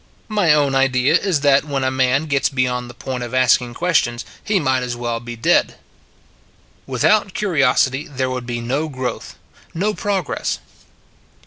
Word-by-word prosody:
My 205 -7 +2
own 145 -2 +3
idea 135 +1 +2
is 180 -4 +1
that 140 -1 +4
when 140 -3 -3
a 130 - +1
man 130 +3 +1
gets 140 -3 +1
beyond 125 -2 -1
the 120 - -12
point 125 0 -5
of 120 +1 -5
asking 125 -1 +2
questions, 150 -9 0 0.2
he 205 -2 +1
might 130 -4 +1
as 125 -1 -3
well 120 -1 -3
be 120 0 -8
dead. 115 - +2 1.1
Without 185 - +1
curiosity 140 -5 +1
there 130 -3 -3
would 125 -1 -5
be 120 -1 -3
no 135 +7 -2
growth, 130 -3 -5 0.4
no 205 +5 0
progress. 195 -6 -2
135 Hz, 155 wpm, -19 LUFS, 125-150 Hz, 1.1 s, that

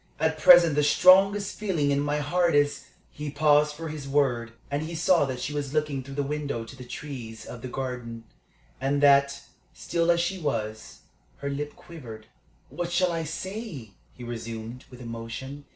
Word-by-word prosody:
At 160 0 0
present 170 -1 +8
the 150 - +2
strongest 195 +6 +5
feeling 170 -9 0
in 140 - +2
my 145 +1 0
heart 170 +3 +1
is 145 0 +2
" - - -34
He 150 0 -6
paused 150 0 +3
for 165 +1 -6
his 150 -2 -7
word, 130 -5 +1 0.2
and 145 +1 -1
he 165 +2 -5
saw 170 -1 +3
that 130 -2 -4
she 145 - -4
was 145 -1 -4
looking 150 -3 0
through 135 +1 -9
the 145 - 0
window 140 -4 -3
to 135 - -11
the 130 - -10
trees 120 -4 -8
of 120 - -9
the 130 - -5
garden, 125 -3 -5 0.6
and 140 +2 0
that, 140 0 +4 0.3
still 170 0 -1
as 170 0 +4
she 185 +2 -1
was, 110 -8 -4 0.4
her 140 0 -4
lip 145 +1 -4
quivered. 120 -11 -11 0.4
"What 170 +5 -4
shall 180 0 +2
I 165 -1 -2
say?" 170 - -6 0.2
he 125 - -10
resumed, 115 +1 -7
with 125 -1 -12
emotion. 120 +5 -7
145 Hz, 185 wpm, -26 LUFS, 125-160 Hz, 0.6 s, present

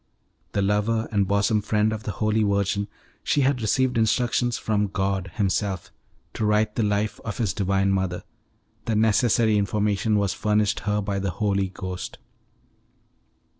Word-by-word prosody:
The 100 - +1
lover 105 +3 +1
and 100 -3 +1
bosom 100 +2 +2
friend 105 +1 +1
of 110 - -5
the 105 - -4
Holy 110 0 +1
Virgin, 100 -1 0 0.4
she 145 - +1
had 135 -2 +1
received 125 +2 +1
instructions 120 +2 +1
from 105 -1 0
God 95 -1 -2
Himself 95 -2 -1 0.4
to - - -3
write 105 0 +2
the 115 - -1
life 105 0 0
of 105 - -5
His 110 -8 0
divine 95 +2 +1
mother; 95 -2 -1 0.6
the 115 - 0
necessary 110 0 +3
information 105 +1 +1
was 100 -2 +1
furnished 105 0 +1
her 105 0 +1
by 100 -1 -2
the 100 0 -1
Holy 100 +1 0
Ghost. 95 -1 -6
105 Hz, 150 wpm, -24 LUFS, 100-110 Hz, 0.6 s, necessary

